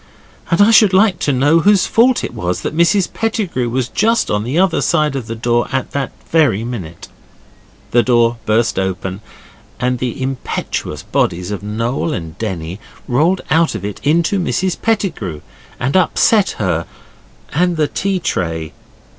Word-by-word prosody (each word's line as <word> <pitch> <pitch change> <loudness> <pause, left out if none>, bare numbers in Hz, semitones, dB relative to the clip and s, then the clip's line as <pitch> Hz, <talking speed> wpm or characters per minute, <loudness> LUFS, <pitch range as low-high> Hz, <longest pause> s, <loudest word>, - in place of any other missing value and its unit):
And 170 - +1
I 220 - +5
should 215 -3 +6
like 190 -1 +4
to 145 - +1
know 145 +5 +3
whose 200 +3 +4
fault 245 +2 +3
it - - -4
was 90 -6 -3
that - - -4
Mrs 170 +3 +2
Pettigrew 200 - -1
was 125 0 -1
just 225 - +1
on 105 0 0
the 130 +7 -2
other 185 -1 +2
side 150 -2 +1
of 125 -5 -4
that 115 0 -7
door 120 0 +2
at 135 -1 -2
that 140 -1 -2 0.2
very 140 -10 +3
minute? 95 -9 -7 0.8
The 120 - +5
door 120 0 +2
burst 110 0 +2
open, 95 +1 -3 0.6
and 125 0 0
the 125 0 -3
impetuous 130 0 -4
bodies 90 +2 -1
of 105 - -4
Noel 115 +9 -2
and 80 - -6
Denny 90 -4 -4 0.3
rolled 160 +9 +2
out 160 -4 +3
of 100 -2 -5
it 105 - -6
into 170 +7 +2
Mrs 180 0 0
Pettigrew, 160 - -1 0.4
and 135 +6 -1
upset 190 +3 +3
her 85 -5 -1 0.7
and 175 +2 +1
the 155 -1 +2
tea 195 +5 -1
tray. 80 - -3
130 Hz, 165 wpm, -17 LUFS, 110-175 Hz, 0.8 s, should